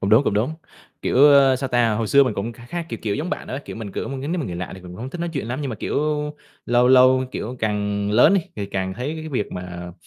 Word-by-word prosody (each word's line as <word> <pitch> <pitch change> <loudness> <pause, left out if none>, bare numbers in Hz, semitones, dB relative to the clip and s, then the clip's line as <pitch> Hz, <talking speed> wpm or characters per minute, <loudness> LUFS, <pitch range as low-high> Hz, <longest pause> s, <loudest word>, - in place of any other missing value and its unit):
cũng 95 - -1
đúng, 115 +6 +6
cũng 100 - +1
đúng. 120 +10 0 0.5
Kiểu, - - 0
ơ, 140 -2 +7
sao 135 0 -3
ta, 120 -3 +2
hồi 110 0 -1
xưa 140 +4 +6
mình 120 -5 -1
cũng 110 +4 -3
kha 120 +1 -14
khá, 175 +5 -4
kiểu, - - -5
kiểu, 105 -2 -1
giống 165 +4 -3
bạn - - -4
đó. 130 - -4
Kiểu, - - -8
mình 105 -3 -7
cử - - -3
mà 135 - -4
nếu 155 +7 -3
mà 135 - -3
người 85 -2 -5
lạ 90 - -4
thì 95 - -11
mình 90 -1 -11
cũng - - -10
hông 130 +3 -5
thích 175 - -7
nói 170 0 -2
chuyện 135 -6 -3
lắm. 130 +4 -3
Nhưng 140 - -2
mà, 110 - -5
kiểu, - - -3 0.7
lâu 120 +1 +4
lâu, 130 0 +6
kiểu, 125 +4 -5
càng 105 -1 -1
lớn 120 - +6
đi, 195 - +3 0.2
thì 100 - -3
càng 95 -1 -3
thấy 130 +8 -4
cái 155 - -7
việc 125 -8 -2
mà 90 -1 -7
120 Hz, 300 wpm, -22 LUFS, 100-135 Hz, 0.7 s, ơ